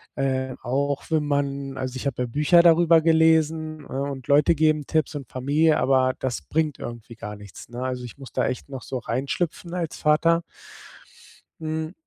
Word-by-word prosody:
äh, 130 -1 -1
auch 140 +3 -1
wenn 155 -2 +2
man 140 -1 -2
also 130 0 -4
ich 135 - -3
habe 125 -2 -2
ja - - -3
Bücher 150 +7 +4
darüber 170 -1 +6
gelesen, 160 -1 +2
ne, 135 - -5
und 135 -3 -7
Leute 145 +3 +4
geben 155 -1 +2
Tipps 155 -1 0
und 135 -6 -6
Familie, 145 +5 +2
aber 130 -1 +3
das 130 -3 -2
bringt 155 -2 -1
irgendwie 120 0 -8
gar 105 -2 -7
nichts, 105 0 -12
ne? 120 0 -7
Also 125 -1 -3
ich 120 - -11
muss 135 -2 -11
da - - +1
echt 125 +2 -4
noch 135 -2 -6
so 130 - -4
reinschlüpfen 140 +8 -3
als 170 -3 -3
Vater. 165 +2 +3 1.2
Hm, 160 +1 -3
140 Hz, 180 wpm, -24 LUFS, 130-160 Hz, 1.2 s, darüber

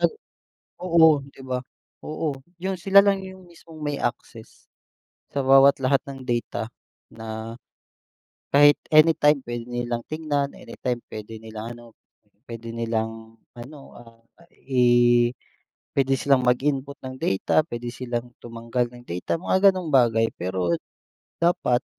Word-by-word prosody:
uh, - - +4 0.8
oo, 160 -5 +5
di - - -17
ba? 130 -1 -4 0.4
Oo, 155 -2 -3 0.2
yun 190 +1 -2
sila 195 +3 +6
lang 195 -1 +1
yung 190 -1 -12
mismong 165 -2 -15
may 145 -1 -2
access. - - -6 0.6
Sa 140 -1 -2
bawat 135 +1 +6
lahat 135 +1 +2
ng 135 -1 -8
data 120 -2 -3 0.4
na 110 0 -7 1.0
kahit 145 +1 +6
anytime 155 -2 +4
puwede 120 0 -6
nilang 120 -1 -3
tignan, 145 -3 -2
anytime 125 -2 -4 0.2
puwede 110 +1 -7
nilang 110 +1 -8
ano, 120 - -14 0.6
pwede 115 0 -7
nilang 115 -1 -4 0.2
ano, 130 +5 -11 0.2
ah, 115 -1 -17 0.4
i 120 -2 +4 0.7
pwede 135 0 +3
silang 135 -1 +2
mag-input 135 +2 0
ng 130 0 -7
data, 115 +8 +1
pwede 120 -6 -6
silang 120 0 -5
tumanggal 115 +1 -3
ng 120 - -13
data, 90 - -3
mga 190 +1 +4
gano'ng 180 -3 -5
bagay, 115 -5 +3
pero 90 -2 -1 0.6
dapat 170 -8 +1
125 Hz, 130 wpm, -24 LUFS, 115-150 Hz, 1.0 s, sila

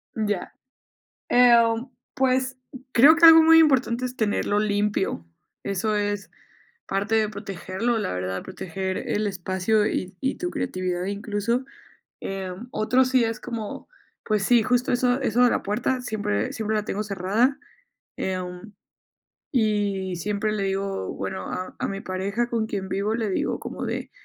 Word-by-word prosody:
Ya, 210 -4 -2 0.8
em, 235 -1 +5 0.3
pues 260 0 +1 0.3
creo 285 +7 +7
que 335 - +4
algo 325 0 +10
muy 325 0 +7
importante 255 -5 +3
es 250 +1 -4
tenerlo 205 -2 0
limpio, 205 - 0 0.4
eso 205 +2 -1
es 205 -3 -2 0.6
parte 200 +3 0
de 215 -1 +2
protegerlo, 200 +3 -3
la 90 - -2
verdad, 90 +1 -3
proteger 190 0 -4
el 210 0 0
espacio 190 +3 0
y 185 0 -2
y 265 0 -1
tu 355 0 -3
creatividad 180 -1 -2
incluso. 205 +4 -2 0.6
Em, 195 +4 -5
otro 255 +4 +3
sí 255 -2 +3
es 225 0 -3
como, 230 - -6 0.4
pues 215 -2 0
sí, 240 0 +5
justo 250 +1 +1
eso 245 +1 +2
eso 245 0 +2
de 245 - +5
la - - 0
puerta 245 +5 -1
siempre 205 - -2
siempre 220 -1 -2
la 210 - -1
tengo 210 0 -2
cerrada, 205 +7 0 0.6
em, 185 +2 -4 0.8
y 205 -5 0
siempre 210 +4 -1
le 205 -2 -1
digo, 195 - -2
bueno, 95 -1 -5
a 185 - -5
a - - -1
mi 195 0 -4
pareja 200 +6 -2
con 225 -2 -1
quien 195 -3 -4
vivo 200 +4 -1
le 220 -3 -1
digo - - -1
como - - -5
de: - - -4
210 Hz, 150 wpm, -24 LUFS, 195-240 Hz, 0.8 s, algo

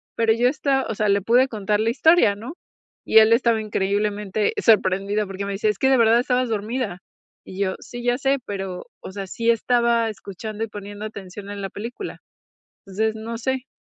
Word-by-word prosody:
pero 225 -1 +3
yo 240 +2 +2
esta 270 0 +1
o 225 - -3
sea, 210 0 0
le 200 0 +3
pude 245 +6 +4
contar 210 -2 -1
la 225 - +1
historia, 275 -5 +4
¿no? 230 +9 -8 0.5
y - - +3
él 220 +1 +6
estaba 230 -1 +3
increíblemente 205 0 -1
sorprendido 200 0 +2
porque 195 +1 -5
me 200 - -3
dice: 210 +2 0
"Es 210 - -2
que 265 - +3
de 265 - +5
verdad 230 0 +5
estabas 250 0 0
dormida" 215 -2 -3 0.5
y 190 - -9
yo: 185 -1 -1
"Sí, 240 0 -9
ya 245 0 +1
sé", 275 0 +2
pero 195 -3 -5 0.2
o - - -8
sea, 195 0 -5
sí 230 +5 -1
estaba 235 0 +2
escuchando 215 +1 -6
y - - -2
poniendo 205 0 -8
atención 200 -1 -8
en 205 0 -6
la 195 - -4
película. 230 +5 -7 0.7
Entonces 215 +3 -1
no 225 +1 -5
sé, 260 +2 -2
215 Hz, 195 wpm, -22 LUFS, 200-235 Hz, 0.7 s, él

